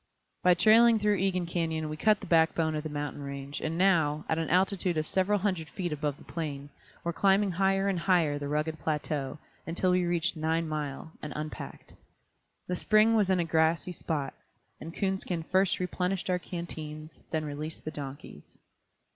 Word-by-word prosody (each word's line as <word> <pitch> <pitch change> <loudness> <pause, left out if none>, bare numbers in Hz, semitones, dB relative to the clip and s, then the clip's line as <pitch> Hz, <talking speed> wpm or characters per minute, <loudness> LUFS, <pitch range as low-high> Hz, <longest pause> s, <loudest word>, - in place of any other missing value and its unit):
By 180 -1 +5
trailing 225 +4 +6
through 210 -1 +2
Egan 185 -2 0
Canyon 165 -2 -2
we 155 - -4
cut 210 +5 +3
the - - -7
backbone 160 -2 +3
of 155 - -2
the 155 - -5
mountain 145 -1 -4
range 140 0 -6
and 160 +1 -2
now, 160 -5 +3
at 160 - 0
an 160 - -2
altitude 185 -1 +2
of 155 - 0
several 190 +5 +1
hundred 185 -6 -1
feet 175 -4 -3
above 145 -1 -2
the - - -15
plain, 145 -3 -5 0.3
were 170 - -1
climbing 195 +2 +3
higher 195 +2 +2
and 190 -3 0
higher 170 -5 +2
the 145 - -4
rugged 155 +2 -1
plateau, 150 -2 -2 0.3
until 175 +2 +1
we 180 0 +3
reached 175 0 0
Nine 160 +1 0
Mile, 150 0 -4
and 150 - -6
unpacked. 155 0 -7 0.7
The 180 - -1
spring 215 +4 +4
was 205 -3 +3
in 185 -1 +3
a 170 - +1
grassy 165 +2 +2
spot, 150 -5 -3 0.5
and 165 - -7
Coonskin 190 -2 -2
first 190 0 +3
replenished 180 0 -1
our 180 - +1
canteens, 155 -3 -7
then 155 -1 -1
released 150 +2 -6
the 155 - -3
donkeys. 135 - -9
165 Hz, 180 wpm, -29 LUFS, 155-185 Hz, 0.7 s, trailing